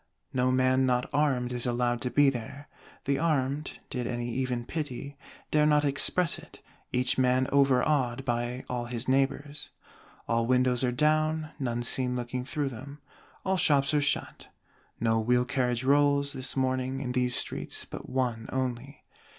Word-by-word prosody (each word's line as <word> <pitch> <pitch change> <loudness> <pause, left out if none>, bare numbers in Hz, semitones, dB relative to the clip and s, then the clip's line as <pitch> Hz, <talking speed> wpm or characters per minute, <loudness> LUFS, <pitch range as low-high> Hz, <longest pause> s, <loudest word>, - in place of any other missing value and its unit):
No 130 0 +2
man 130 0 +3
not 125 -1 +1
armed 130 -4 +1
is 125 0 -1
allowed 120 0 0
to 125 - -1
be 140 +3 +4
there: 135 +4 -7 0.4
the 140 0 +1
armed, 145 -2 -1
did 125 -1 -2
any 120 0 -3
even 125 -1 -2
pity, 140 -1 -5 0.4
dare 150 0 +4
not 150 -1 +3
express 165 +5 +1
it, - - -15 0.3
each 125 +1 +1
man 130 0 +3
overawed 135 -2 +2
by 120 +1 -2
all 125 -1 -3
his 120 0 -4
neighbors. 140 +2 0 0.6
All 115 0 +1
windows 125 0 +2
are 125 - +2
down, 155 +3 +1
none 120 -3 -2
seen 125 +1 0
looking 125 +1 -3
through 145 0 -2
them. 140 +4 -9 0.5
All 190 0 +1
shops 140 -4 +3
are 150 - +3
shut. 145 - -1 0.5
No 115 -1 +2
wheel 125 +2 +2
carriage 125 -2 0
rolls, 140 +1 +3
this 130 +1 -3
morning, 130 0 0
in 130 -2 -3
these 125 0 +1
streets, - - -1
but - - -9
one 120 -4 -2
only. 130 +1 -4
130 Hz, 160 wpm, -28 LUFS, 125-140 Hz, 0.6 s, be